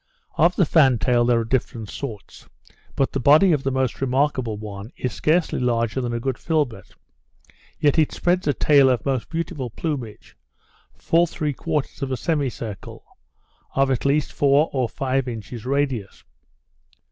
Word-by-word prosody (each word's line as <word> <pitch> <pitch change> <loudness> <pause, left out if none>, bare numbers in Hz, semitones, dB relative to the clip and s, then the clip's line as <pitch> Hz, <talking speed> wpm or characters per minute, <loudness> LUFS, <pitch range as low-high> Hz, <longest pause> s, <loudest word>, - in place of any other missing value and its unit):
Of 170 +3 +3
the 185 - +3
fan 135 -5 +4
tail 120 0 +2
there 120 -1 +3
are - - -4
different 115 -2 -2
sorts; 110 -2 -8 0.5
but 135 - +1
the 135 - -2
body 150 +9 +5
of 150 -4 +2
the 135 - -1
most 130 -2 -1
remarkable 130 -4 0
one 105 +1 -8
is 125 -3 -3
scarcely 165 +2 +1
larger 120 0 0
than 120 -1 -3
a 120 - -2
good 130 +1 -3
filbert, 145 - -2 0.8
yet 145 +2 +2
it 155 - +3
spreads 180 -1 0
a 145 - +3
tail 140 -3 +5
of 125 -4 0
most 135 -4 -1
beautiful 160 -6 -4
plumage, 125 -4 -6 0.6
full 170 +1 +2
three 150 -2 -3
quarters 150 0 -3
of 135 - -2
a 130 - -1
semi 150 -4 0
circle, 110 -5 -8 0.7
of 135 0 +2
at 130 - -1
least 140 +2 +1
four 145 +2 +3
or 130 -4 0
five 135 -1 -1
inches 115 0 -7
radius. 135 -7 -2
135 Hz, 165 wpm, -22 LUFS, 120-150 Hz, 0.8 s, body